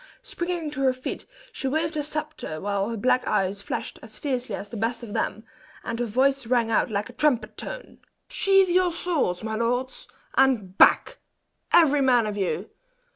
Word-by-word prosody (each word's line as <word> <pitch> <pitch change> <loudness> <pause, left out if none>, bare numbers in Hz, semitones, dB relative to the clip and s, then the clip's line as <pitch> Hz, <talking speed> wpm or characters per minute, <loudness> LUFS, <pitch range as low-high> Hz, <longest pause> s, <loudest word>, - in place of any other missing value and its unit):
Springing 345 -3 -3
to 280 -2 -5
her 260 -1 +3
feet, 255 0 -6 0.3
she 280 - -4
waved 315 +3 0
her 305 - -1
sceptre, 300 - -5
while 200 +2 -1
her 230 - -3
black 255 +4 +2
eyes 195 -1 0
flashed - - -5
as 220 -1 -12
fiercely 250 -7 -2
as 200 - -7
the - - -8
best 230 +3 -2
of 215 -3 -7
them, 220 - -2 0.4
and 230 - -4
her 240 - 0
voice 265 +3 +1
rang 235 -2 +2
out 225 - +2
like 205 -1 -2
a - - -12
trumpet 290 -6 +1
tone. - - -7 0.3
"Sheathe 390 -1 +3
your 360 0 +3
swords, 325 - -1
my 220 0 -3
lords, 245 +3 -2 0.3
and 235 -9 +2
back - - +5 0.5
every 295 -4 +5
man 250 -4 +4
of 210 -1 -3
you! 195 -3 -2
250 Hz, 180 wpm, -25 LUFS, 215-300 Hz, 0.5 s, back